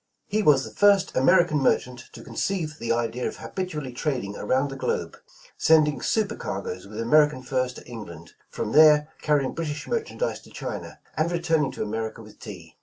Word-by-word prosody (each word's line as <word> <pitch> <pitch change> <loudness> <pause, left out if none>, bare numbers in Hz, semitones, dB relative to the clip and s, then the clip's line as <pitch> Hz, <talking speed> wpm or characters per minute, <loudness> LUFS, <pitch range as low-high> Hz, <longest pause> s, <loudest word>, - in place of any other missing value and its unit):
He 215 +1 0
was 145 -8 +5
the - - -8
first 200 -2 +4
American 155 +2 +4
merchant 125 -2 0
to - - -10
conceive 160 -6 -3
the 115 - -2
idea 120 +1 -1
of - - -6
habitually 155 -9 -5
trading 125 -7 -2
around 135 +2 0
the - - -6
globe, 135 - -2 0.4
sending 155 -2 +4
super 220 -1 0
cargoes 95 -1 -5
with 105 +2 -8
American 145 +3 +3
furs 130 -1 -1
to - - -12
England, 85 -9 -10 0.2
from 105 - -4
there 150 +1 +6
carrjdng 145 -3 +1
Brit 165 -2 -3
ish 145 +1 -5
merchandise 470 +2 -2
to - - -17
China, - - -6 0.2
and 160 +2 0
returning 165 -5 +1
to - - -3
America 110 +1 -4
with 110 - -16
tea. 90 -8 -11
140 Hz, 180 wpm, -25 LUFS, 115-160 Hz, 0.4 s, there